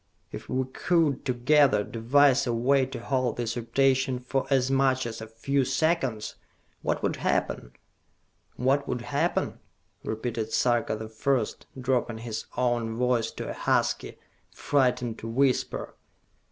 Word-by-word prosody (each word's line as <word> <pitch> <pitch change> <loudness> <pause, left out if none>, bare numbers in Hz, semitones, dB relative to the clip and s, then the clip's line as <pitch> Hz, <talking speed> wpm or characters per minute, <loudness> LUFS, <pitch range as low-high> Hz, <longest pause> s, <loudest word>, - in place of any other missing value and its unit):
If - - -8
we 130 +1 0
could, 155 +1 +1
together, 130 -3 +3
devise 130 +5 +3
a 120 - +1
way 130 +3 +2
to 135 - -7
halt 130 -1 -1
this 115 -1 -2
rotation 130 +2 +1
for 130 +2 -2
as 135 -1 +2
much 135 -1 +2
as 115 -1 -5
a 110 - -7
few 135 +5 0
seconds, 135 -5 0 0.4
what - - -1
would - - 0
happen?" - - -1 0.8
"What 135 +3 +1
would 125 - -2
happen?" 140 +4 -1 0.4
repeated 110 0 -3
Sarka 120 -3 +2
the 110 0 -6
First, 120 +1 -1
dropping 125 -3 0
his 115 -1 -5
own 120 -2 0
voice 125 -1 +1
to - - -6
a - - -4
husky, - - 0 0.3
frightened 125 -4 0
whisper. 125 +4 0
125 Hz, 135 wpm, -27 LUFS, 115-135 Hz, 0.8 s, together